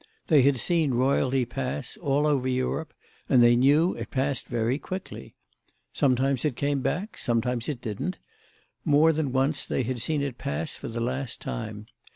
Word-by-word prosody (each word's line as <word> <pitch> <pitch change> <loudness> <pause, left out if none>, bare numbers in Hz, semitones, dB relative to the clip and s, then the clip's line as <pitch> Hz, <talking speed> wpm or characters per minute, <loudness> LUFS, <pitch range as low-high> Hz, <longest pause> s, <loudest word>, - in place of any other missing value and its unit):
They 150 -4 +6
had 135 +1 +3
seen 155 +1 +1
royalty 130 0 +2
pass, 130 +1 -4
all 145 -1 0
over 140 -4 +1
Europe, 130 +5 -1 0.4
and 125 -3 +6
they 120 0 +6
knew 145 +8 +4
it - - -7
passed 135 0 -1
very 120 +3 0
quickly. 185 +3 -7 0.6
Sometimes 130 -1 +2
it 150 -5 0
came 140 +2 0
back; 195 - -2
sometimes 120 +1 0
it 135 -5 -4
didn't; 110 - -3 0.7
more 155 +1 +4
than 150 -3 -1
once 135 +3 +1
they - - -1
had 120 0 -3
seen 150 +1 0
it 135 -4 -4
pass 145 +3 -2
for - - -7
the 115 0 -4
last 125 +1 -3
time. 105 -1 -5
135 Hz, 170 wpm, -26 LUFS, 125-145 Hz, 0.7 s, They